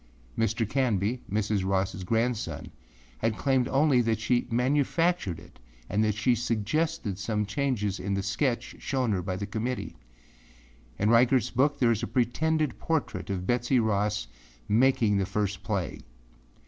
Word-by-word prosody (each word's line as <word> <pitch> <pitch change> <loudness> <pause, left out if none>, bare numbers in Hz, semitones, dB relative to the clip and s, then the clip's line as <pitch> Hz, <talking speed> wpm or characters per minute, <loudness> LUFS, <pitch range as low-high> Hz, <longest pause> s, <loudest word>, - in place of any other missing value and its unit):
Mr. 115 0 0
Canby, 120 -1 0
Mrs. 105 -1 0
Rossâ 95 0 -1
grandson, 115 +3 -1 0.5
had 110 - 0
claimed 130 -3 +2
only 135 -2 +3
that 115 -2 0
she 120 +2 +1
manufactured 140 - +1
it - - -16 0.3
and 105 +2 +2
that 105 -2 +1
she 120 +4 +2
suggested 120 - -1
some 105 +1 -1
changes 105 -4 -1
in 100 +2 -2
the 100 - -1
sketch 120 +5 -1
shown 130 -4 -1
her 95 -3 0
by 95 +1 -3
the 100 +2 -3
committee. 115 +4 -3 1.0
In 105 - +1
Reigartâs 120 +2 +4
book 140 +4 +2
there 120 -4 +3
is 110 - 0
a - - -2
pretended 155 +5 0
portrait 160 -9 -2
of 95 -2 -2
Betsey 120 +3 +2
Ross 105 - 0 0.4
making 115 -2 +3
the 95 - 0
first 100 0 -1
flag. 100 -5 -3
115 Hz, 150 wpm, -28 LUFS, 100-130 Hz, 1.0 s, Reigartâs